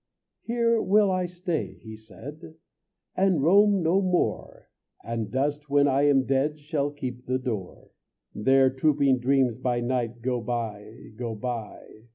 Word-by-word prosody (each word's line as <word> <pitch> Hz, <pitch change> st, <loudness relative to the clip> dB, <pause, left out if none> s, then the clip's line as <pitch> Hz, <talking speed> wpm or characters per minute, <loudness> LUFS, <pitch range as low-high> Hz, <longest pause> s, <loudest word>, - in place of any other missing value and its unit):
"Here 235 Hz, -1 st, +1 dB
will 205 Hz, 0 st, +3 dB
I 185 Hz, -1 st, 0 dB
stay," 175 Hz, -2 st, -4 dB
he 110 Hz, -1 st, -9 dB
said, 145 Hz, +9 st, -11 dB, 0.6 s
"And 185 Hz, -6 st, +2 dB
roam 200 Hz, +2 st, +4 dB
no 175 Hz, +5 st, +3 dB
more, 180 Hz, -2 st, -2 dB, 0.3 s
And 115 Hz, -2 st, -4 dB
dust 145 Hz, +3 st, -2 dB
when 145 Hz, 0 st, +4 dB
I 140 Hz, +1 st, +3 dB
am 135 Hz, -2 st, +4 dB
dead 140 Hz, +3 st, 0 dB
Shall 145 Hz, -1 st, -2 dB
keep 130 Hz, -4 st, -7 dB
the 130 Hz, 0 st, +1 dB
door." 110 Hz, -8 st, -6 dB, 0.4 s
There 135 Hz, +4 st, +3 dB
trooping 135 Hz, -1 st, +2 dB
dreams 130 Hz, -2 st, +1 dB
by 125 Hz, -2 st, 0 dB
night 120 Hz, -1 st, -2 dB
Go 125 Hz, -1 st, -1 dB
by, 110 Hz, -2 st, -5 dB
go 115 Hz, -2 st, -4 dB
by. 110 Hz, -1 st, -7 dB
135 Hz, 145 wpm, -26 LUFS, 120-160 Hz, 0.6 s, roam